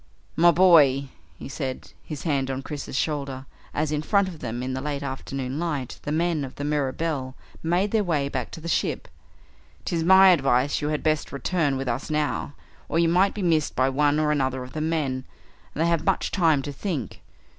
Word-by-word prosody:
"My 170 +2 +6
boy," 150 -7 +5 0.3
he - - -8
said, 135 -2 -5
his 150 -3 -7
hand 140 -5 0
on 135 0 -3
Chris's 145 -3 -6
shoulder, 140 -3 -2 0.3
as 150 0 -1
in 150 -1 0
front 200 +4 +2
of 170 -4 -8
them 120 -1 -4
in 130 0 -3
the 130 - -3
late 145 0 -3
afternoon 135 0 -4
light 150 -7 -3
the 145 - -4
men 165 -1 0
of 130 - -7
the 145 - -5
Mirabelle 145 -1 -2 0.3
made 180 +5 +1
their 220 -2 +2
way 155 -7 0
back 130 -4 -3
to 165 - -7
the 165 - -8
ship, - - -1 0.8
"'tis 165 -2 -1
my 190 +2 +8
advice 135 -5 +2
you 145 - -1
had 150 -1 -2
best 155 -1 0
return 140 0 0
with 135 0 -4
us 120 +5 -2
now, 150 -1 -1 0.3
or 160 - 0
you 165 0 +3
might 185 +4 +3
be 205 - -3
missed 160 -4 +1
by 130 +1 +2
one 145 +2 +2
or 150 -1 +2
another 130 -3 0
of 125 - -11
the 155 - -3
men, 150 -5 -1 0.5
and 155 - +1
they - - +2
have 170 -2 +1
much - - 0
time 160 -7 +3
to 145 - -5
think. 145 - -4
150 Hz, 205 wpm, -25 LUFS, 135-165 Hz, 0.8 s, my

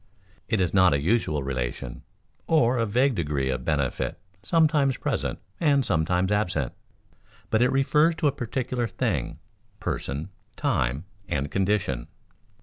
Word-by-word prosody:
It 110 - +1
is 90 -3 +1
not 95 -6 +5
a - - +1
usual 80 - +1
relation 60 -2 -4 0.5
or 130 -6 +3
a 115 - +1
vague 125 +6 +3
degree 75 - -1
of 65 -1 -3
benefit 70 -4 -1 0.2
sometimes 150 +1 +3
present - - -2 0.2
and 140 -5 +3
sometimes 90 +2 +1
absent, 90 -10 0 0.8
but 110 - +3
it 125 - +4
refers 150 +4 +3
to 160 - -2
a - - +3
particular 125 -1 -2
thing, 95 - -2 0.4
person, 75 +6 -3 0.3
time, 65 +7 0 0.2
and 70 0 -1
condition. 95 -11 0
100 Hz, 135 wpm, -26 LUFS, -, 0.8 s, not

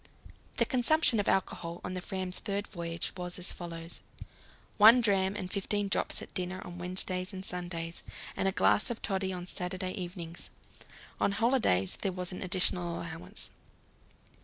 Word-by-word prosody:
The - - +4
consumption 255 -2 +3
of 205 - 0
alcohol 170 -2 0
on 180 - -4
the 185 - -3
Fram's 185 -1 -3
third 200 -1 -2
voyage 170 -4 -4
was 180 -1 -3
as 180 0 0
follows: 165 -1 -6 0.8
One 220 +4 +9
dram 195 -4 +3
and 185 -2 -4
fifteen 205 0 0
drops - - 0
at - - -11
dinner 185 0 -2
on 175 -1 -8
Wednesdays 185 +1 0
and 190 0 -6
Sundays, 175 -2 -3 0.3
and 195 - +1
a - - +4
glass 210 - +3
of 240 - -4
toddy 190 -1 0
on 180 -1 -4
Saturday 185 +1 -2
evenings. 175 -3 -5 0.7
On 200 - +2
holidays 220 - +3
there 195 - +1
was 180 0 -4
an 180 - -5
additional 180 -1 +3
allowance. 170 +5 -5
185 Hz, 160 wpm, -31 LUFS, 175-200 Hz, 0.8 s, One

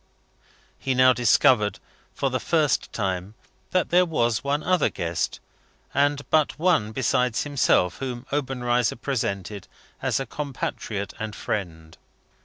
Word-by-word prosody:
He 130 -1 -1
now 130 0 +6
discovered, 120 -3 +3 0.4
for 135 - 0
the 130 - 0
first 155 -3 +1
time, 95 0 -3 0.3
that 185 -1 0
there 180 +1 +6
was 120 -10 0
one 145 +2 0
other 185 0 +2
guest, 85 -1 -2 0.5
and 145 0 +1
but 155 -2 +3
one, 160 -11 +2
besides 125 0 +1
himself, 135 -10 +2
whom 125 -2 -5
Obenreizer 125 -4 0
presented 105 -7 -3 0.3
as - - 0
a 135 - -3
compatriot 115 -7 -4
and 110 -1 -4
friend. 80 -6 -5
125 Hz, 125 wpm, -25 LUFS, 105-145 Hz, 0.5 s, now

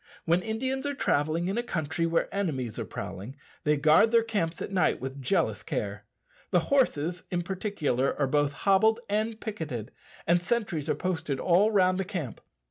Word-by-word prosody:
When 170 +2 +3
Indians 260 +6 -2
are 285 - -2
travelling 160 - +1
in 195 +5 -1
a - - +2
country 165 -6 -2
where 165 0 +1
enemies 135 - -2
are - - -3
prowling, 100 +8 -7 0.3
they 150 0 +3
guard 155 +9 +5
their 230 0 +4
camps 175 -8 -2
at - - -5
night 185 -4 +2
with 135 +1 -6
jealous 130 - +1
care. 100 0 -4 0.4
The 180 - +4
horses 180 - +1
in 175 -1 -1
particular 170 - -1
are 140 - +3
both 145 +1 +1
hobbled 220 +3 +4
and 215 +2 -1
picketed, 155 - -5 0.3
and 175 +1 +3
sentries 175 -7 -1
are - - +2
posted 165 -7 -2
all 185 +4 +4
round 185 -3 +3
the - - +1
camp. 175 - -5
175 Hz, 175 wpm, -28 LUFS, 145-205 Hz, 0.4 s, guard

